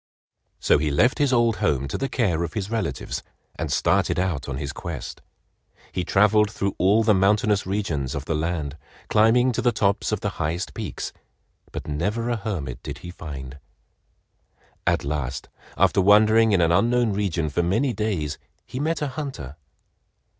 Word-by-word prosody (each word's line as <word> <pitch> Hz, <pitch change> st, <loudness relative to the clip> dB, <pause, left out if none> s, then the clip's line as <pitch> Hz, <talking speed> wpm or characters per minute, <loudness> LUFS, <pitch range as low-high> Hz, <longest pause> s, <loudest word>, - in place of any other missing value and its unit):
So -, -, +3 dB
he 75 Hz, +1 st, 0 dB
left 75 Hz, -, +2 dB
his 145 Hz, -2 st, +3 dB
old 120 Hz, -3 st, +3 dB
home 70 Hz, -10 st, 0 dB
to -, -, -4 dB
the 135 Hz, -, -2 dB
care 90 Hz, -10 st, 0 dB
of 85 Hz, -1 st, -4 dB
his 105 Hz, 0 st, -3 dB
relatives, 115 Hz, -1 st, -3 dB, 0.3 s
and -, -, -4 dB
started -, -, +2 dB
out 85 Hz, -7 st, -1 dB
on 65 Hz, -, -3 dB
his 70 Hz, -1 st, -4 dB
quest. -, -, -6 dB, 0.7 s
He 90 Hz, -, -2 dB
traveled 105 Hz, +3 st, +4 dB
through 100 Hz, -1 st, -2 dB
all 100 Hz, +5 st, +4 dB
the 110 Hz, -1 st, +4 dB
mountainous 100 Hz, +1 st, +2 dB
regions 85 Hz, -10 st, -2 dB
of 75 Hz, -1 st, -4 dB
the 80 Hz, -, -1 dB
land, 80 Hz, -2 st, -2 dB, 0.3 s
climbing 115 Hz, +4 st, +4 dB
to -, -, -1 dB
the 120 Hz, -, +3 dB
tops 100 Hz, -3 st, 0 dB
of 110 Hz, -, -1 dB
the 105 Hz, -, -1 dB
highest 85 Hz, +3 st, -2 dB
peaks, -, -, -5 dB, 0.6 s
but -, -, -6 dB
never 105 Hz, +11 st, -1 dB
a 120 Hz, -, 0 dB
hermit 80 Hz, -, -4 dB
did -, -, -6 dB
he 90 Hz, -, -6 dB
find. 70 Hz, -5 st, -8 dB, 1.3 s
At -, -, +2 dB
last, 70 Hz, -3 st, -3 dB, 0.3 s
after -, -, +4 dB
wandering 110 Hz, +3 st, +5 dB
in 95 Hz, -3 st, +3 dB
an 85 Hz, 0 st, +3 dB
unknown 120 Hz, +4 st, +3 dB
region 90 Hz, -6 st, -1 dB
for 85 Hz, -, +1 dB
many 110 Hz, +10 st, +1 dB
days, 95 Hz, -9 st, -2 dB, 0.3 s
he 130 Hz, -, -6 dB
met 155 Hz, +1 st, -1 dB
a 145 Hz, -, -1 dB
hunter. 130 Hz, -, -6 dB
100 Hz, 170 wpm, -24 LUFS, 75-110 Hz, 1.3 s, wandering